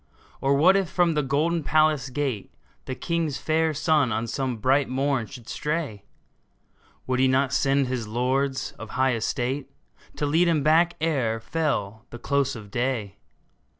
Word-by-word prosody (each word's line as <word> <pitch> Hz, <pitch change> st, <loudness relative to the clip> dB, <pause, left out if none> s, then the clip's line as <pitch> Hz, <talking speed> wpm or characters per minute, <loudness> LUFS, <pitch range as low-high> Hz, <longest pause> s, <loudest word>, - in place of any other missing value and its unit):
Or 135 Hz, +1 st, +3 dB
what 175 Hz, +7 st, +5 dB
if 195 Hz, -4 st, +1 dB
from 175 Hz, -2 st, +2 dB
the 150 Hz, -, +1 dB
golden 155 Hz, +5 st, 0 dB
palace 155 Hz, -3 st, +2 dB
gate 130 Hz, -6 st, -3 dB, 0.3 s
The 130 Hz, -, -4 dB
king's 165 Hz, -3 st, -2 dB
fair 160 Hz, +2 st, +1 dB
son 150 Hz, -4 st, +2 dB
on 110 Hz, +2 st, -1 dB
some 130 Hz, +1 st, -2 dB
bright 135 Hz, +5 st, +2 dB
morn 130 Hz, -3 st, 0 dB
should 125 Hz, -4 st, -12 dB
stray? 150 Hz, -10 st, -3 dB, 1.0 s
Would 130 Hz, 0 st, -1 dB
he 130 Hz, -, +4 dB
not 135 Hz, +1 st, +2 dB
send 135 Hz, 0 st, +2 dB
his 125 Hz, -3 st, -3 dB
lords 130 Hz, +4 st, -1 dB
of 115 Hz, -, -8 dB
high 130 Hz, 0 st, +3 dB
estate 130 Hz, +4 st, -2 dB, 0.5 s
To 150 Hz, -, -1 dB
lead 160 Hz, +5 st, +3 dB
him 160 Hz, -4 st, +2 dB
back 165 Hz, +3 st, +4 dB
ere 135 Hz, -9 st, 0 dB
fell 110 Hz, -7 st, -2 dB
the 120 Hz, -, -8 dB
close 140 Hz, +1 st, 0 dB
of 105 Hz, -3 st, -10 dB
day 120 Hz, -5 st, -2 dB
135 Hz, 160 wpm, -25 LUFS, 125-155 Hz, 1.0 s, what